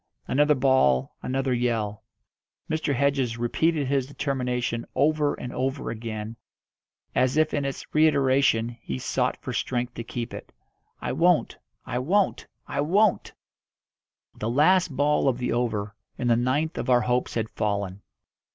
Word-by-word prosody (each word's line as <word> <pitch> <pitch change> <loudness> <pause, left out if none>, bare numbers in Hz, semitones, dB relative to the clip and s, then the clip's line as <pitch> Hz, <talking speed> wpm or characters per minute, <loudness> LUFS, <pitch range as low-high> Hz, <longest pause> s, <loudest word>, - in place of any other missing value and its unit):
Another 150 +3 +3
ball, 125 - +2
another 130 0 -1
yell. 115 -4 -1 0.6
Mr. 155 -3 -1
Hedges 135 -3 +1
repeated 150 +6 +1
his 135 -1 0
determination 125 -4 -2
over 150 +1 +2
and 125 - -7
over 130 +2 -2
again, 110 0 -6 0.8
as 130 +3 +2
if 155 0 +2
in 145 -1 0
its 135 - -4
reiteration 135 -6 +3
he 65 - -4
sought - - -1
for - - -4
strength 125 -1 -2
to 115 - -6
keep 120 +1 -5
it. - - -9 0.5
"I - - -2
won't! 170 +4 +2 0.3
I 125 -1 -2
won't! 185 +9 +1 0.2
I - - -1
won't!" 195 +7 +2 1.0
The 110 - -4
last 170 +9 +4
ball 145 0 +2
of 130 -3 +2
the 125 -1 -2
over, 105 -4 -1 0.2
and 120 -1 0
the - - +5
ninth 130 +7 0
of - - -3
our 125 -1 +5
hopes 125 0 0
had 110 -1 -2
fallen. 100 -2 -2
130 Hz, 145 wpm, -25 LUFS, 120-145 Hz, 1.0 s, the